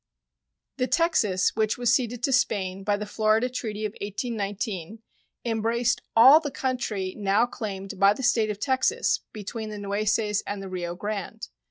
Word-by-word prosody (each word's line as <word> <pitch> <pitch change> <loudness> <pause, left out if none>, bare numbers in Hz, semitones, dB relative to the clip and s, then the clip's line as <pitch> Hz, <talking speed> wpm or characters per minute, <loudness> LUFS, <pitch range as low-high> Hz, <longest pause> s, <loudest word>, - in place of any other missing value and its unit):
The 255 - 0
Texas 245 - +2
which 215 -1 +1
was 240 -1 +2
ceded 245 -2 0
to 270 - +1
Spain 195 -6 0
by 205 0 +1
the 210 - -4
Florida 215 +3 +1
treaty 215 -4 -4
of 210 - -2
1819 205 -1 -4 0.4
embraced 230 +1 0
all 260 +7 +9
the 300 -3 -4
country 250 -9 -2
now 205 +2 +2
claimed 195 -5 -6
by 200 +1 +6
the 265 - -7
State 225 -3 +2
of 210 -1 -4
Texas 270 - +1
between 215 +1 -6
the 210 - -6
Nueces 210 +1 0
and 205 0 -3
the 195 -1 -7
Rio 175 -2 -4
Grande. 205 - -5
215 Hz, 160 wpm, -26 LUFS, 200-240 Hz, 0.4 s, all